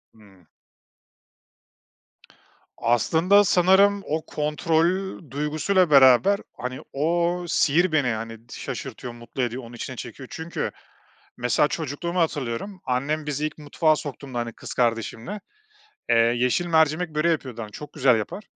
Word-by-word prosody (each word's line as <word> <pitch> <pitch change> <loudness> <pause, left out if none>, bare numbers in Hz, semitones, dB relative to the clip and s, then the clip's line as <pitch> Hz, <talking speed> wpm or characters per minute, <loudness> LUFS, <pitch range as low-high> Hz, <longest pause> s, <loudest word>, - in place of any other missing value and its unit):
Hıı. 100 -5 -20 2.3
Aslında, 160 - +3
sanırım 195 +2 +4
o 155 +1 -2
kontrol 165 +5 0
duygusuyla 155 +6 +1
beraber, 140 +8 +6 0.2
hani, 125 +1 -5
o 170 +4 0
sihir 170 +3 +2
beni, 145 -4 +2
hani, 115 -1 -4
şaşırtıyor, 125 -2 -6
mutlu 120 +2 -7
ediyor, 125 +1 -2
onun 115 +1 -11
içine 130 +2 -6
çekiyor. 125 +2 -8
Çünkü, 165 +1 -4 0.7
mesela, 125 +4 +2
çocukluğumu 160 +4 -3
hatırlıyorum, 155 - -2
annem 145 +5 -1
bizi 150 +1 -1
ilk 155 - -7
mutfağa 155 +1 +1
soktuğunda, 140 -3 -6
hani, 120 -1 -3
kız - - -9
kardeşimle, 120 - -1 0.7
eee, 115 - +5
yeşil 120 +8 +2
mercimek 160 0 +2
böreği 160 +3 +2
yapıyordu, 130 -7 -4
hani, 105 - -8
çok 150 +6 -9
güzel 130 -5 +3
yapar. 190 - -5
150 Hz, 125 wpm, -24 LUFS, 120-170 Hz, 2.3 s, beraber